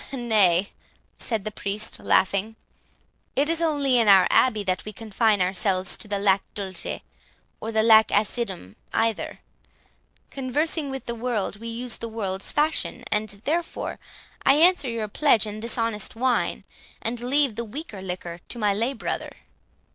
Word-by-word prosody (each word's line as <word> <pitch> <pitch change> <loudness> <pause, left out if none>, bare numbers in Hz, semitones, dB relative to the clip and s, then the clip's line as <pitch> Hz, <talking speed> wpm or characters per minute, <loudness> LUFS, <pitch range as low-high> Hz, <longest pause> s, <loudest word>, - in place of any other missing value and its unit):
"Nay," 205 -7 +4 0.4
said 220 -5 -1
the 215 - -3
Priest, 205 +1 -2
laughing, 200 +3 +1 0.8
"it 285 +2 +2
is 330 0 +1
only 285 -6 +2
in 225 - +2
our 190 -2 +7
abbey 220 -5 +3
that 185 -2 -1
we 215 - -7
confine 215 -1 +1
ourselves 185 0 +1
to - - -7
the 205 -1 -1
'lac 195 -1 +3
dulce' 195 -2 -4 0.6
or 225 - -5
the 220 -1 +2
'lac 220 -1 +7
acidum' 200 - -1 0.2
either. 225 -1 -1 0.9
Conversing 285 +3 -1
with, 270 0 -6
the 235 - -3
world, 230 -4 -2
we 230 +2 -8
use 235 +1 -2
the 230 - -6
world's 195 -4 -3
fashions, 300 +2 0
and 210 +1 0
therefore 330 +3 -2 0.4
I 270 - +5
answer 330 -3 +4
your 230 -2 -3
pledge 230 0 +3
in 210 0 -6
this 230 +2 -2
honest 225 -3 -1
wine, 250 +1 0 0.4
and 235 +1 -3
leave 270 0 +2
the 235 - -4
weaker 230 - -8
liquor 180 -2 -6
to - - -2
my 210 -3 +2
lay 230 +6 0
brother." 245 - -4
225 Hz, 155 wpm, -24 LUFS, 200-250 Hz, 0.9 s, our